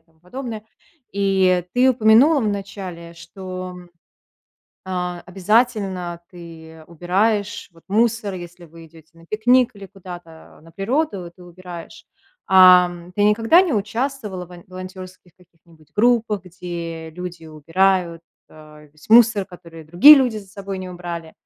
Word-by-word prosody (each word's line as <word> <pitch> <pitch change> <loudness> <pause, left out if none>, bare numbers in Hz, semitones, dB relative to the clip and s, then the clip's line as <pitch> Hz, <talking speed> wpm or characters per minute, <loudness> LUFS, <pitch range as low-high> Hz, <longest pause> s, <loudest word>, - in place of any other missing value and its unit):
тому 160 -1 -35
подобное. 225 +3 -7 0.5
И 190 -3 +1
ты 250 +1 +3
упомянула 255 +5 +4
вначале, 195 -5 -5
что, 185 +1 -9 1.1
а, 180 -1 -4
обязательно 190 -3 -1
ты 160 -2 -13
убираешь 195 +5 -1
вот 165 - -22
мусор, 215 -1 0
если 175 0 -10
вы 165 +1 -15
идете 160 0 -19
на 165 0 -19
пикник 245 +5 +2
или 200 -1 -11
куда-то 175 -6 -13
на 165 - -17
природу, 195 - -3
ты 180 - -17
убираешь. 175 -1 -11 0.4
Ам, 180 -2 +5
ты 205 +2 0
никогда 225 - +4
не 345 -7 -2
участвовала 215 -2 -3
вн 175 0 -14
волонтерских 185 -1 -11
каких-нибудь 165 -3 -25
группах, 225 -3 +2
где 170 -2 -7
люди 175 -1 -9
убирают, 170 +2 0 0.3
э, 150 -1 -16
весь 155 +5 -20
мусор, 225 -3 +5
который 170 -3 -13
другие 180 - +8
люди 250 -5 +1
за 200 -2 -9
собой 195 0 -7
не 185 -1 -7
убрали? 170 -2 -7
185 Hz, 130 wpm, -20 LUFS, 170-210 Hz, 1.1 s, другие